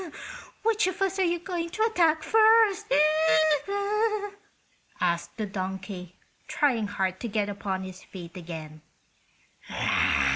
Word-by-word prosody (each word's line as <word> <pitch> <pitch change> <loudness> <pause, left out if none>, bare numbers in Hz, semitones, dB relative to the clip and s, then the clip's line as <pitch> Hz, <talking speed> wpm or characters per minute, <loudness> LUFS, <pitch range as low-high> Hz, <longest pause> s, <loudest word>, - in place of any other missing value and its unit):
"Which 435 -3 +2
of 370 +1 -3
us 385 0 -1
are - - +4
you 345 -1 +1
going 345 -1 -4
to 435 +6 -1
attack 335 -8 +2
first?" 440 -4 +4 2.1
asked 170 +1 -1
the 215 - -2
donkey, 190 -2 -6 0.3
trying 240 -8 +1
hard 190 -2 -2
to 235 - -4
get 210 -2 -1
upon 195 -2 -3
his 185 0 -9
feet 175 -3 -11
again. 160 -3 -8
210 Hz, 115 wpm, -27 LUFS, -, 2.1 s, are